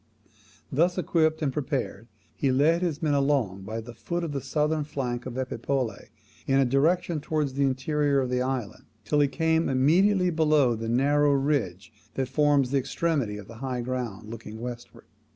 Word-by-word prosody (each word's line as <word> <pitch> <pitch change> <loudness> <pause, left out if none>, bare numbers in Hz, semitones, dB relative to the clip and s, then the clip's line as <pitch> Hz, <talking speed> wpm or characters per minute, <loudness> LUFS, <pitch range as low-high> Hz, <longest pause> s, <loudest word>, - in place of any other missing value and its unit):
Thus 170 +6 +2
equipped 160 -3 +1
and 135 -3 0
prepared, 130 -6 -3 0.3
he 135 - +1
led 155 +6 +3
his 170 -3 -2
men 150 -2 +2
along 135 -9 +1
by 110 +2 -4
the 120 +1 -10
foot 170 +9 -4
of 165 - -3
the 140 -1 -3
southern 150 +2 0
flank 130 -4 -4
of 125 0 -6
Epipolae, 130 -3 -3 0.4
in 135 - +3
a 135 - +4
direction 155 +5 +1
towards 150 -2 -1
the 140 - -2
interior 140 +2 +1
of 130 -2 -1
the 125 0 +1
island, 130 -5 -3 0.2
till 145 +8 +1
he 145 - +4
came 160 +2 +1
immediately 180 +8 +3
below 150 -6 +3
the 115 0 -4
narrow 145 +4 +3
ridge 115 -9 -1 0.2
that 130 -1 -2
forms 145 -2 +2
the 140 - +3
extremity 135 -6 -1
of 105 -1 -10
the 115 - -11
high 130 0 -3
ground 120 -5 -4
looking 110 -1 -8
westward. 120 0 -8
135 Hz, 175 wpm, -26 LUFS, 125-150 Hz, 0.4 s, a